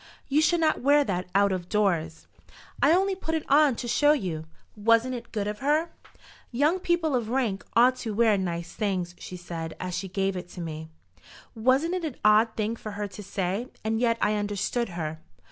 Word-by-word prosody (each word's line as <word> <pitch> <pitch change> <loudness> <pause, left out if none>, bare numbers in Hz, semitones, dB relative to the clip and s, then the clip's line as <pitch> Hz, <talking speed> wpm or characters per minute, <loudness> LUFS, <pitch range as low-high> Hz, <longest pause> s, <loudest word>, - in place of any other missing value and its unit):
"You 290 +2 +3
should 345 +2 +3
not 315 -1 +2
wear 285 +3 +5
that 180 -7 -2
out 200 0 +4
of 180 -2 -3
doors." 170 -6 0 0.6
"I - - +5
only 385 +3 +3
put 325 -4 -3
it 315 - -2
on 285 -2 +5
to 240 - -5
show 290 +5 +4
you. 170 - -3 0.3
Wasn't 230 +4 +3
it 235 -1 -7
good 210 -2 -2
of 210 0 -4
her? 305 +5 +1 0.6
'Young 295 +9 +2
people 345 -5 +1
of 235 -3 -1
rank 235 -6 -1
ought 250 +2 +5
to 230 -3 -4
wear 225 -1 +4
nice 170 -3 -3
things,' 185 -5 -2
she 180 - -8
said, 165 -2 -6
as 185 -1 -4
she 195 - -3
gave 195 +1 -1
it 180 0 -8
me. 160 -2 -6 0.6
Wasn't 260 +9 +2
it 365 -2 -2
an 300 -6 -3
odd 215 +2 +5
thing 220 +1 -1
for 215 -2 -7
her 205 0 -3
to 195 +2 -9
say? 195 +3 -3 0.2
and 220 +1 0
yet 230 -1 +2
I 210 - +2
understood 205 +3 -1
her." 160 -3 -5
220 Hz, 195 wpm, -26 LUFS, 185-270 Hz, 0.6 s, wear